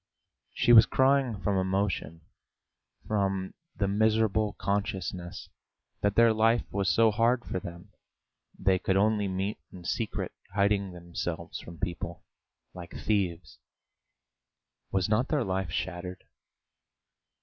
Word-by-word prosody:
She 120 - +4
was 110 -2 +9
crying 130 -5 +2
from 100 -2 +1
emotion, 95 -4 -1 0.9
from 95 -3 -1 0.2
the 100 - 0
miserable 110 0 +2
consciousness 95 -3 -3 0.5
that 100 0 +1
their 115 -1 +6
life 115 +2 +3
was 100 -3 0
so 110 +5 +4
hard 120 +3 +2
for - - -3
them; 85 +3 -10 0.7
they 95 -1 +2
could 95 +1 +1
only 105 0 +2
meet 95 +2 -2
in 90 -2 -11
secret, - - -2 0.2
hiding 100 -1 +2
themselves 85 -1 -5
from 85 0 -11
people, 85 -1 -5 0.5
like 90 -2 -10
thieves! 90 -5 -1 1.3
Was 95 -2 +1
not 110 +5 +2
their 150 -5 +1
life 95 -3 -2
shattered? 90 +3 -4
100 Hz, 115 wpm, -29 LUFS, 90-110 Hz, 1.3 s, was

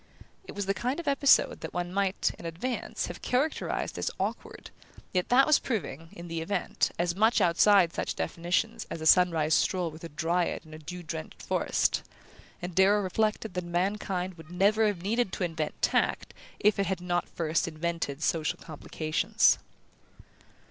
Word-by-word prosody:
It - - -9
was 205 -1 -2
the 195 - +1
kind 250 - -2
of 335 - -7
episode 280 -1 +4
that - - -7
one 175 0 -2
might, 195 -1 +1
in - - -10
advance, 210 +10 -3
have - - -8
characterized 270 +5 -1
as - - 0
"awkward", - - -4 0.4
yet 180 -1 0
that 260 +2 +6
was 305 - +5
proving, 165 - -4
in 170 0 -9
the 165 -1 -3
event, 200 +5 -1
as 175 0 0
much 220 +4 +3
outside 185 0 +5
such - - -3
definitions 195 +7 -1
as - - -5
a 160 - -5
sunrise 160 -3 +4
stroll 180 -1 +1
with 155 +2 -13
a 165 - -6
dryad 170 +3 -1
in 155 - -13
a 155 - -9
dew 175 +4 -8
drenched 155 - -7
forest; - - +1 0.6
and 175 0 -4
Darrow 200 +3 +4
reflected 215 +2 -1
that 180 -1 -2
mankind 180 +1 -2
would 160 - -12
never 205 +5 +3
have 190 -5 -2
needed 225 0 0
to - - -2
invent 160 -3 -3
tact - - +1 0.3
if 210 -1 +3
it 195 - +1
had 190 -1 -1
not 175 0 -1
first 165 0 -1
invented 165 -2 -3
social 160 -2 0
complications. 155 0 +1
180 Hz, 170 wpm, -28 LUFS, 165-205 Hz, 0.6 s, that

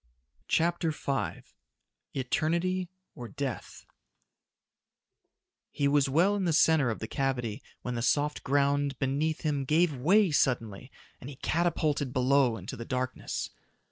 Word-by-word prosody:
CHAPTER 170 0 +1
V 140 -3 -2 0.7
Eternity 170 +7 0 0.2
or 120 - -8
Death 135 +1 -6 1.8
He 140 - 0
was 140 -1 +3
well 175 +9 +3
in 195 -2 -1
the 170 - +1
center 155 -4 +4
of 110 - -2
the 110 - -6
cavity 125 -6 -2 0.2
when 125 - -3
the 120 - -2
soft 145 +4 +1
ground 140 0 +1
beneath 145 +4 -1
him 145 -3 -1
gave 155 +3 +2
way 180 +8 +3
suddenly 125 -4 0 0.3
and 125 - -9
he 145 - -9
catapulted 150 -3 0
below 130 -2 +3
into - - -7
the 115 - -6
darkness. 130 +1 -3
140 Hz, 130 wpm, -29 LUFS, 130-160 Hz, 1.8 s, center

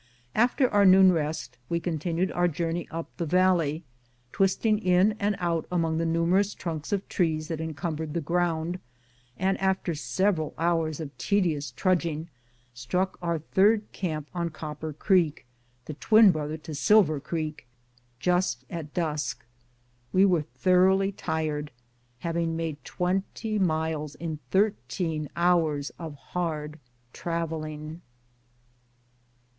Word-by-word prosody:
After 250 +3 +3
our 205 -3 +3
noon 190 0 +8
rest 150 -6 -3
we 170 - +1
continued 170 +2 -1
our 175 0 +2
journey 170 +1 -2
up 165 0 -6
the 170 - -1
valley, 175 -2 +2 0.5
twisting 205 +3 +2
in 185 +1 +4
and 205 0 +1
out 170 -2 -1
among 165 -2 +1
the 165 - 0
numerous 175 +5 +2
trunks 160 -4 -5
of 200 -1 -1
trees 155 -3 0
that 160 -1 -3
encumbered 160 0 -4
the - - +1
ground, 170 +1 -1 0.6
and 190 +1 0
after 190 -2 +1
several 155 - 0
hours 165 -2 0
of 145 -4 -6
tedious 155 -3 +1
trudging 170 +2 0 0.4
struck 180 +11 -1
our 170 -1 0
third 205 +7 +2
camp 155 -5 -3
on 170 -1 -1
Copper 155 0 -6
Creek, 160 -2 +1 0.4
the 155 - -5
twin 215 +6 +6
brother 155 -1 -3
to 155 0 -9
Silver 155 -1 +4
Creek, 155 -1 -4 0.5
just 175 -5 +1
at 155 -3 -6
dusk. 150 -8 -2 0.7
We 190 +1 +5
were 180 -5 +3
thoroughly 185 +4 +3
tired, 155 -5 -2 0.5
having 165 0 -1
made 160 -3 -4
twenty 195 +4 -2
miles 160 -4 -1
in 160 -2 -5
thirteen 180 -6 0
hours 165 -5 +2
of 160 -3 -6
hard 155 0 -4 0.3
traveling. 160 -1 -4
165 Hz, 125 wpm, -27 LUFS, 155-185 Hz, 0.7 s, noon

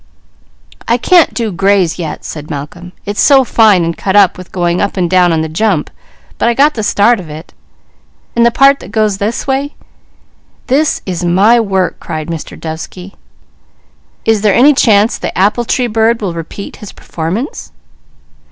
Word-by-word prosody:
"I 235 - +2
can't 345 +6 +3
do 230 -3 -3
gray's 190 -2 +1
yet," 160 -3 -6
said 150 -1 -8
Malcolm. 160 +4 -7
"It's 205 +1 -2
so 275 -3 +5
fine, 215 -7 +3
and 165 0 -2
cut 195 0 -2
up, 200 -3 +5
with 185 -1 -12
going 175 -1 -1
up 200 0 -2
and 180 -2 +1
down 180 0 +3
on 160 -1 0
the 160 - -2
jump, 170 0 -1 0.5
but - - +2
I 235 - 0
got 290 +4 +3
the 225 - -4
start 210 +3 +2
of 170 -4 -10
it, 155 +2 -10 0.8
and 235 - +3
the 235 - +5
part 275 +3 +4
that - - -11
goes 215 -2 0
this 215 +3 -2
way 275 +2 -2 0.4
" - - -38
"This 300 +2 +1
is 180 -2 -4
my 195 +7 +3
work!" 190 -5 -1
cried 155 +1 -6
Mr. 165 -2 -7
Dovesky. 165 +4 -8 1.1
"Is 225 -2 +2
there 210 -2 +2
any 285 +4 +5
chance 220 -4 +2
the - - -5
apple 210 +5 +1
tree 250 +2 0
bird 225 0 +1
will 195 -5 -3
repeat 170 +4 -8
his 210 - -10
performance?" 170 - -5
200 Hz, 180 wpm, -13 LUFS, 175-235 Hz, 1.1 s, so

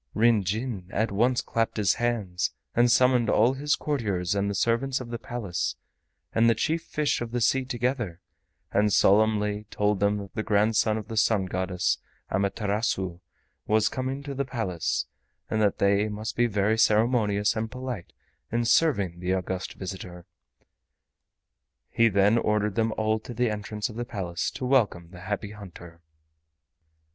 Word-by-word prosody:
Ryn 115 -2 +4
Jin 105 0 -3
at 110 +1 0
once 120 +5 +2
clapped 115 0 -1
his 100 -3 +3
hands 100 -8 -1 0.2
and 120 0 +4
summoned 125 -2 +4
all 115 +4 +4
his 145 +2 0
courtiers 100 - -1
and 100 0 0
the 100 - -2
servants 120 +6 +1
of 120 -2 -8
the 120 - -4
Palace, 105 -10 -3 0.6
and 115 +1 +4
the 115 - +3
chief 160 +9 0
fish 150 -6 -1
of 120 - -3
the 120 +1 -2
sea 130 +3 +2
together, 120 -7 -2 0.5
and 105 +1 +2
solemnly 105 +1 +3
told 105 -1 0
them 100 +1 +2
that 100 -2 -8
the 110 - -2
grandson 110 +1 +2
of 105 -1 -6
the 115 -1 -6
Sun 105 -3 +3
Goddess, 95 0 -1 0.3
Amaterasu, 100 -2 -1 0.5
was 110 0 +3
coming 130 +2 -3
to 140 -1 -5
the 140 +1 -1
Palace, 110 -11 -2 0.5
and 110 - +1
that 105 -2 +2
they 100 +2 +2
must 105 +2 -5
be 120 0 +3
very 105 +1 +1
ceremonious 105 -2 +3
and 110 0 -2
polite 125 -6 -6 0.4
in 120 +1 0
serving 100 - +2
the 90 +1 0
august 95 0 -4
visitor. 90 -2 -7 1.7
He 115 0 +4
then 100 +3 +4
ordered 105 -2 0
them 115 0 +1
all 110 0 +1
to 120 +2 -9
the 120 -1 +1
entrance 105 0 -3
of 110 - -10
the 120 - -3
Palace 90 -6 -3
to 130 - -6
welcome 105 -10 +1
the 90 - -11
Happy 100 +3 -4
Hunter. 85 -5 -12
110 Hz, 160 wpm, -26 LUFS, 100-120 Hz, 1.7 s, Ryn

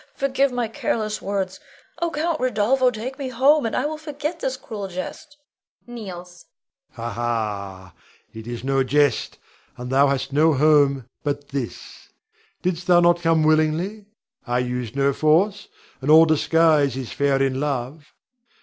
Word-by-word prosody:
Forgive 275 0 +1
my 245 -2 -1
careless 215 -1 -2
words! 190 -1 -3 0.4
Oh, 340 - +1
Count 325 +1 -2
Rodolpho, 255 +1 +2
take 250 +4 -6
me 270 -2 -3
home, 270 +2 +3
and - - -3
I 255 - 0
will 305 +1 -3
forget 300 +2 -5
this 265 -3 -2
cruel 210 -6 -7
jest 190 - -8 0.5
[kneels]. 180 -7 -9 0.5
Rod. 115 - -7
Ha, 120 - -2
ha! 100 -5 -4 0.4
It 110 0 -9
is 120 0 -6
no 135 0 +1
jest, 145 0 +1 0.4
and 125 +1 -6
thou 140 +2 +4
hast 135 0 -2
no 155 +1 +4
home 140 -3 +3 0.2
but 145 0 -3
this. 135 -4 -7 0.5
Didst 180 -1 -2
thou 175 -1 +6
not 175 0 +3
come 165 -1 +2
willingly? 155 +7 +1 0.4
I 120 0 0
used 125 -1 -3
no 140 0 +2
force; 180 +9 +2 0.3
and 135 - -3
all 160 +1 +8
disguise 155 -3 +3
is 130 -3 -6
fair 140 -1 +1
in 135 -1 0
love. 145 +1 -4
160 Hz, 155 wpm, -22 LUFS, 135-220 Hz, 0.5 s, all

